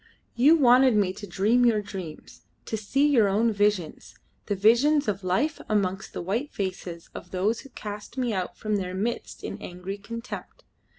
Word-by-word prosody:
You 280 +7 +6
wanted 255 -4 +5
me 195 -3 +2
to 205 +1 -9
dream 210 +7 +2
your 220 -3 +3
dreams, 185 -6 -8 0.2
to - - -3
see 260 +7 +1
your 240 -8 +4
own 220 +3 +2
visions 205 -6 -1 0.3
the 205 - 0
visions 255 +9 +4
of 200 -1 -2
life 190 - 0
amongst 195 -2 -1
the - - -4
white 230 - -2
faces 185 -3 -5
of 175 - -9
those 200 +5 0
who 275 - -12
cast 210 +1 -8
me 245 -3 0
out 185 -2 -3
from 215 -1 -1
their 185 -1 -4
midst 230 +5 -3
in - - -6
angry 180 +3 -6
contempt. 230 +4 -8
210 Hz, 175 wpm, -26 LUFS, 190-240 Hz, 0.3 s, You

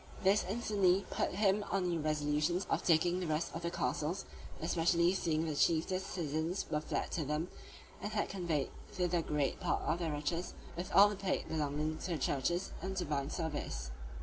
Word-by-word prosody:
This 195 +2 +5
instantly 200 -4 +2
put - - 0
him 200 +1 +3
on 185 -1 +1
new 170 -2 0
resolutions 150 +3 +1
of - - +2
taking 175 +2 +3
the 180 - -2
rest 155 +2 -1
of 165 - -4
the 170 - -1
castles, 170 +1 -1 0.3
especially 170 +1 +3
seeing 165 -4 0
the 155 - -1
chiefest 170 +5 +2
citizens 160 +1 -1
were 150 - +1
fled - - -2
to 160 - -1
them, 150 +5 -1 0.5
and 205 +2 -3
had 215 -1 0
conveyed 170 -7 -1 0.2
thither 180 -3 +1
great 150 -3 0
part - - 0
of 170 - 0
their 165 -3 -1
riches, 150 +4 -2 0.2
with 175 +2 -4
all 200 +1 +9
the 205 - -2
plate 190 -1 -1
belonging 155 0 -1
to 180 - -4
the - - 0
churches 175 +7 0
and 190 0 -3
divine 150 -6 -1
service. 145 - -3
170 Hz, 180 wpm, -34 LUFS, 155-185 Hz, 0.5 s, all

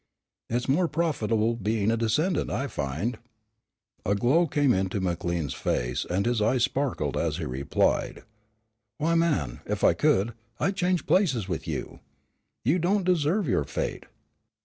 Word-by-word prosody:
"It's 120 +2 -1
more 165 +6 +3
profitable 115 -9 0
being 110 -1 0
a - - +2
descendant, 115 - +1
I 125 +8 -1
find." 85 - -3 0.8
A 100 - +1
glow 140 +12 +3
came 145 -3 +2
into 95 +1 -1
McLean's 85 -5 -2
face - - -1
and 95 +3 0
his 120 -2 +1
eyes 120 +3 +2
sparkled 130 - -1
as 80 -2 0
he 85 - -3
replied: 70 +1 0 0.7
"Why, 165 +3 +1
man, 100 - +1
if - - -2
I - - +6
could, 105 +5 +2 0.3
I'd 195 - 0
change 180 -3 0
places 140 - +2
with 85 -3 -4
you. 75 -4 -4 0.7
You 155 +9 +3
don't 190 +4 +1
deserve 180 +1 +1
your 115 - +2
fate. - - -4
115 Hz, 150 wpm, -27 LUFS, -, 0.8 s, I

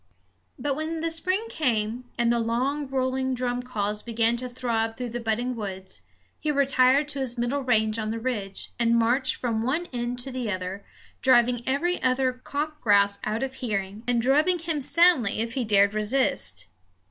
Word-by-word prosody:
But 285 -2 -1
when 315 +2 -3
the 330 0 0
spring 370 +6 0
came, 240 - -1
and 235 -1 +3
the 235 - +1
long 255 +6 -1
rolling 260 0 -1
drum 245 0 -1
calls 210 -4 -2
began 230 0 +1
to 250 +1 -4
throb 230 -2 -1
through 250 -1 -4
the 240 - -3
budding 240 +2 -1
woods, 190 -4 -6 0.4
he 305 - -2
retired 275 0 +3
to 285 -1 -4
his 255 -2 -1
middle 240 +4 0
range 220 -3 +1
on 215 -1 -2
the 225 - -2
ridge, 220 -5 -4
and 235 0 +3
marched 245 +3 +2
from 230 -3 -1
one 280 +9 0
end 240 0 -2
to 265 +2 -5
the 250 -3 -3
other, 185 0 -4 0.4
driving 245 -2 +4
every 340 +7 0
other 255 0 +2
cock 295 +4 -4
grouse 200 -2 +4
out 220 +4 -1
of 265 -1 -3
hearing, 205 -4 -3
and 240 -2 +2
drubbing 300 +8 +3
him 330 -3 -3
soundly 285 - +3
if 230 +1 -2
he 260 - 0
dared 200 -2 +4
resist. 210 - 0
245 Hz, 180 wpm, -26 LUFS, 225-270 Hz, 0.4 s, driving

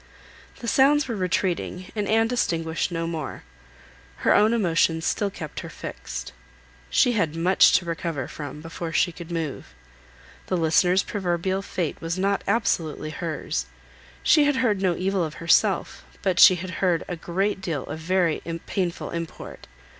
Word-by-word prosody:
The 235 - -5
sounds 275 +3 +4
were 235 - -3
retreating, 185 -1 -2
and 210 -2 -1
Anne 225 +1 +3
distinguished 165 -9 -1
no 165 -1 -2
more. 160 -4 -5 0.8
Her - - +6
own 215 +2 +5
emotions 165 -6 +2
still 205 - 0
kept 160 -6 -7
her - - -7
fixed. - - -7 0.6
She 160 - +4
had 165 -9 0
much 180 +3 +5
to 175 - +3
recover 165 -5 -3
from, 150 0 -7
before 165 0 -6
she 175 +4 +2
could 170 0 -10
move. 165 -5 -4 0.7
The 185 - 0
listener's 175 +3 +3
proverbial 190 -1 -1
fate 180 -4 -3
was 165 +2 -3
not 195 +1 0
absolutely 165 -8 0
hers; 155 - -3 0.6
she 300 -2 +5
had 290 -1 +2
heard 225 -7 +1
no 185 -3 +2
evil 190 0 0
of 155 -2 -4
herself, 165 - +2 0.2
but 185 -3 +1
she 185 - +9
had 180 +1 -6
heard 180 -4 +2
a 180 - -3
great 190 +4 -1
deal 160 -7 -3
of 160 - -6
very 175 0 +1 0.2
painful 180 -3 -2
import. 170 -1 -7
175 Hz, 155 wpm, -24 LUFS, 165-195 Hz, 0.8 s, she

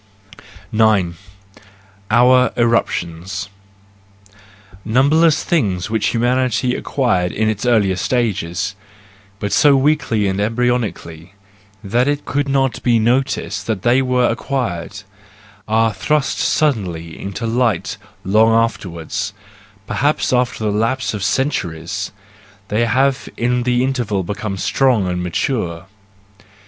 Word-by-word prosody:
9 110 -6 +3 1.0
Our 125 +2 +5
Eruptions. 95 -5 -1 0.7
— - - -32 0.6
Numberless 150 +7 +3
things 100 - 0
which 110 -2 +1
humanity 125 +1 +1
acquired 95 -13 0
in 110 +1 0
its 110 +2 -1
earlier 105 -6 +3
stages, 100 -4 -1 0.7
but 105 - -3
so 145 +4 +5
weakly 135 -6 +1
and 95 0 -1
embryonically 110 -7 -2 0.5
that 120 +6 +1
it 145 0 -1
could 145 0 -1
not 135 -3 0
be 120 -2 +3
noticed 125 +5 0
that 105 -4 -2
they 120 +2 +4
were 125 -1 +2
acquired, 105 -6 -3 0.6
are 110 0 +2
thrust 150 -2 0
suddenly 90 - 0
into 100 +4 -5
light 115 -4 0 0.3
long 110 +4 +4
afterwards, 100 -5 -2 0.5
perhaps 145 +5 0
after 125 -2 0
the 105 - +1
lapse 115 +6 0
of 105 -2 -4
centuries: 100 - -2 0.6
they 110 +3 +1
have 130 +3 +1
in 125 +1 +1
the 125 0 +1
interval 120 -7 -1
become 105 +1 -4
strong 125 0 +2
and 90 0 -2
mature. 90 -1 -2
115 Hz, 110 wpm, -18 LUFS, 100-125 Hz, 1.0 s, Our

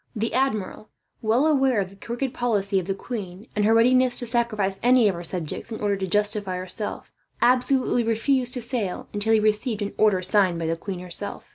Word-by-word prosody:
The 225 +1 -2
admiral, 215 -6 -1 0.3
well 230 +6 +2
aware 270 -6 +3
of 190 -1 -3
the - - -15
crooked 240 +5 -4
policy 205 -5 0
of 180 - -6
the 195 - -1
queen, 195 -3 -7
and 210 -1 +1
her 220 - +4
readiness 250 +2 +4
to 245 - +4
sacrifice 220 -5 -1
any 245 -1 +5
of 200 - +2
her 170 0 -7
subjects 170 +5 -5
in 220 - -5
order 205 -1 0
to 190 -1 -3
justify 205 -1 0
herself, 185 +3 -6 0.3
absolutely 250 0 +2
refused 245 +3 +1
to 250 - -3
sail 230 -6 -3
until 210 +2 +1
he 220 - +5
received 215 +1 0
an 205 - -4
order 200 -4 +3
signed 185 -2 +2
by 165 - -3
the 165 +1 0
queen 180 +1 -6
herself. 180 +3 -6
215 Hz, 205 wpm, -24 LUFS, 195-240 Hz, 0.3 s, any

